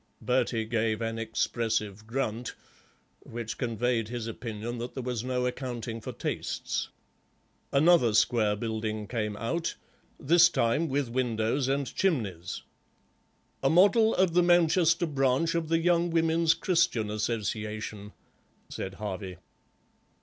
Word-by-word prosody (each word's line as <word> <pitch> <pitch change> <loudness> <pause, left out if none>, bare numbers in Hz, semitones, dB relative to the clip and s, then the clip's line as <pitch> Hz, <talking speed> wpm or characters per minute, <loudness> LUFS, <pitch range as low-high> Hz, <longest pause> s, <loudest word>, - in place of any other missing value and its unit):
Bertie 125 -3 0
gave 110 -1 0
an 115 0 -3
expressive 110 -2 -2
grunt, 120 -1 -3 0.6
which 115 -1 -7
conveyed 120 -2 0
his 120 -1 -4
opinion 115 +1 -5
that 120 +2 -6
there 130 - -4
was 120 -2 -3
no 125 0 -1
accounting 120 -3 -4
for - - -6
tastes. - - -3 0.8
Another 140 -6 +4
square 110 -2 +3
building 110 -1 -3
came 105 -2 -3
out, 165 +9 -2 0.4
this 170 +4 +6
time 150 +3 +1
with 140 0 0
windows 120 +1 0
and 135 -1 -1
chimneys. 110 - -1 1.0
"A 135 - +3
model 205 - +5
of 185 -2 +2
the 180 - +5
Manchester 175 0 +4
branch 140 +1 +1
of 165 -2 -1
the 165 - +3
Young 170 +1 +2
Women's 165 0 +3
Christian 165 - +1
Association," 105 -1 -3 0.6
said 95 0 -5
Harvey. 95 -3 -5
120 Hz, 120 wpm, -28 LUFS, 110-160 Hz, 1.0 s, this